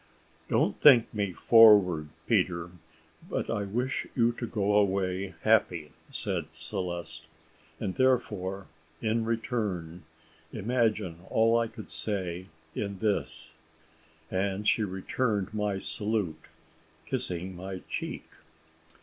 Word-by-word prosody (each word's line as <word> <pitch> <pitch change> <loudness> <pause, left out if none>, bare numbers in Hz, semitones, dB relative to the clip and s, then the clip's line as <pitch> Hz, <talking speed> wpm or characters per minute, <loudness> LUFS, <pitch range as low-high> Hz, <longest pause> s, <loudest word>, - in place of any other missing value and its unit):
"Don't - - +1
think 125 -6 +7
me 100 -3 -1
forward, 95 -6 +6 0.2
Peter, 85 -1 +1 0.6
but - - -2
I 105 - -1
wish 125 +6 -2
you 120 -1 +4
to 120 0 -5
go 105 -2 0
away 95 -2 +1
happy," 90 -8 +2 0.2
said - - -2
Celeste; 85 -5 -5 0.5
"and 95 - -2
therefore, 100 -7 0 0.3
in 115 0 0
return, 105 -7 -2 0.5
imagine 110 -6 0
all 115 +1 +3
I 115 0 +2
could 110 -1 -10
say 95 -3 -2 0.3
in 100 -1 -3
this 105 +1 -2 0.4
" 80 0 -32
and 100 +2 -1
she 110 - +3
returned 100 +1 -1
my 105 -2 -1
salute, 100 -6 -2 0.6
kissing 90 +1 -3
my 95 +1 -6
cheek. - - -4
100 Hz, 110 wpm, -29 LUFS, 90-110 Hz, 0.6 s, think